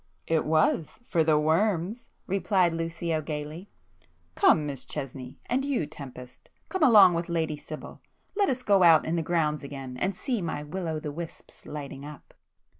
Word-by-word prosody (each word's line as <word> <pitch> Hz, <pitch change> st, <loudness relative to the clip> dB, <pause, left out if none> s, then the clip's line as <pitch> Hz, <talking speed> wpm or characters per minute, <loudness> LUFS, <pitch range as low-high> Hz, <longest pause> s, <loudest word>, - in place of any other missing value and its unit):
"It 160 Hz, -1 st, +1 dB
was,—for 160 Hz, +4 st, +1 dB
the 155 Hz, -1 st, +3 dB
worms!" 180 Hz, +7 st, 0 dB, 0.2 s
replied 190 Hz, -2 st, +2 dB
Lucio 165 Hz, -1 st, -2 dB
gaily—"Come, 155 Hz, -, -2 dB
Miss 140 Hz, -3 st, -5 dB
Chesney,—and 135 Hz, -, -4 dB
you 275 Hz, -, 0 dB
Tempest, 130 Hz, -4 st, -11 dB, 0.2 s
come 375 Hz, -, -3 dB
along 210 Hz, -, +8 dB
with 170 Hz, +1 st, -2 dB
Lady 160 Hz, -2 st, 0 dB
Sibyl,—let 375 Hz, -, -5 dB
us 250 Hz, -1 st, -2 dB
go 200 Hz, -4 st, +4 dB
out 165 Hz, -3 st, +7 dB
in 160 Hz, -, -1 dB
the 165 Hz, -, +1 dB
grounds 155 Hz, -2 st, 0 dB
again, 135 Hz, -2 st, -7 dB
and 190 Hz, +7 st, -1 dB
see 240 Hz, +1 st, -2 dB
my 160 Hz, -3 st, -3 dB
will 170 Hz, +4 st, -5 dB
o' 160 Hz, -1 st, -2 dB
the 150 Hz, -1 st, -5 dB
wisps 165 Hz, +2 st, -9 dB
lighting 140 Hz, -2 st, -7 dB
up." 150 Hz, 0 st, -11 dB
160 Hz, 150 wpm, -27 LUFS, 150-190 Hz, 0.2 s, along